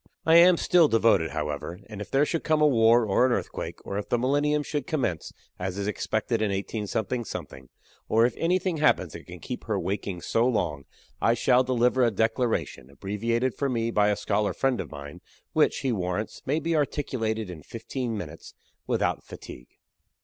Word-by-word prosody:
I 160 +1 +7
am 175 +1 +7
still 170 -2 +4
devoted, 110 - +3
however, 75 +4 -4
and 105 -2 -8
if 105 - -7
there 140 +2 +3
should 165 +1 -2
come 155 -1 +2
a 150 - +5
war 115 -3 +5
or 110 +5 +3
an - - 0
earthquake, - - -3
or 100 - -3
if 105 - -7
the 120 - +2
millennium 145 +4 +1
should 145 -2 -3
commence, 120 - -2 0.3
as 90 +1 -3
is 100 - -2
expected 110 +2 -1
in 110 - +1
18, 100 +2 -3 1.2
or 115 +1 +4
if 120 - +1
anything 180 0 0
happens 155 0 +2
that - - -10
can - - -9
keep - - -7
her - - -1
waking 95 -2 -3
so 115 +7 +1
long, 75 - -1 0.4
I 115 - +3
shall 125 +2 +3
deliver 125 0 +2
a 120 - +4
declaration, 110 - -1
abbreviated 115 - -1
for 140 - -1
me 115 -2 -1
by 105 -2 +3
a 105 - +2
scholar 105 0 0
friend 135 -2 0
of - - -8
mine, 70 0 -9 0.3
which, - - +2
he 130 - 0
warrants, 95 0 -3
may 145 +4 +1
be 165 +1 -1
articulated 110 -8 -1
in 80 -3 -9
fifteen 115 - -5
minutes 80 -4 -9 0.3
without - - 0
fatigue. - - -11
115 Hz, 185 wpm, -26 LUFS, 100-135 Hz, 1.2 s, I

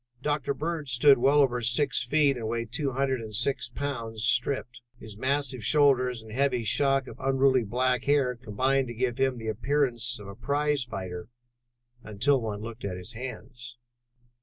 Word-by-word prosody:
Dr. 145 -2 -1
Bird 155 -1 -4
stood 135 +2 +5
well 140 +4 +4
over 125 -2 0
six 120 +3 +2
feet 140 +2 +2
and 115 -3 -5
weighed 115 0 -3
two 135 +1 -1
hundred 135 -1 0
and 110 -2 -6
six 130 +4 +1
pounds 115 -6 -4
stripped: 125 0 0 0.2
his 110 -2 -10
massive 130 0 -1
shoulders 130 -4 +3
and 110 - -12
heavy 130 0 0
shock 135 +4 +2
of - - -11
unruly 135 -1 +2
black 125 +3 0
hair 140 -3 +2
combined 130 +4 0
to 120 - -7
give 125 +1 -2
him 130 -1 +1
the 115 - -8
appearance 120 +1 0
of 105 -2 -11
a 100 - -8
prize 145 +5 0
fighter 95 -6 -6 0.7
until 115 +6 +1
one 105 -2 -4
looked 115 +1 -8
at 95 -3 -4
his 90 -1 -8
hands. 120 0 -8
125 Hz, 170 wpm, -27 LUFS, 115-140 Hz, 0.7 s, stood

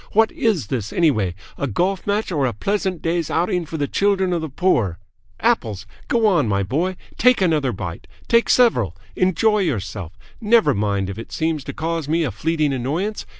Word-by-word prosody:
What 220 +1 +4
is 210 - 0
this, 110 -1 -3
anyway 110 - +1 0.2
a 140 - -1
golf 180 - -1
match 205 0 0
or 145 -6 +1
a 120 - -2
pleasant 190 - -2
day's 170 -1 0
outing 175 0 0
for 160 - -5
the 145 -2 -1
children 195 -1 +1
of 170 - -1
the 160 - -4
poor? 120 - +1 0.4
Apples! 105 -2 0 0.2
Go 230 -2 +2
on, 175 - +3
my 100 -1 +1
boy, 165 - -1 0.2
take 250 +2 +5
another 155 -8 +2
bite. 90 -6 -6 0.2
Take 235 0 +3
several. 125 - +3 0.2
Enjoy 210 +4 +2
yourself! 100 - -3 0.2
Never 225 +1 +4
mind 100 -2 0
if 100 - -8
it 115 - -9
seems 160 -3 -1
to - - -4
cause 165 -2 -3
me 165 +1 +2
a 140 - -1
fleeting 155 -1 0
annoyance. 155 - -2
160 Hz, 185 wpm, -21 LUFS, 115-190 Hz, 0.4 s, take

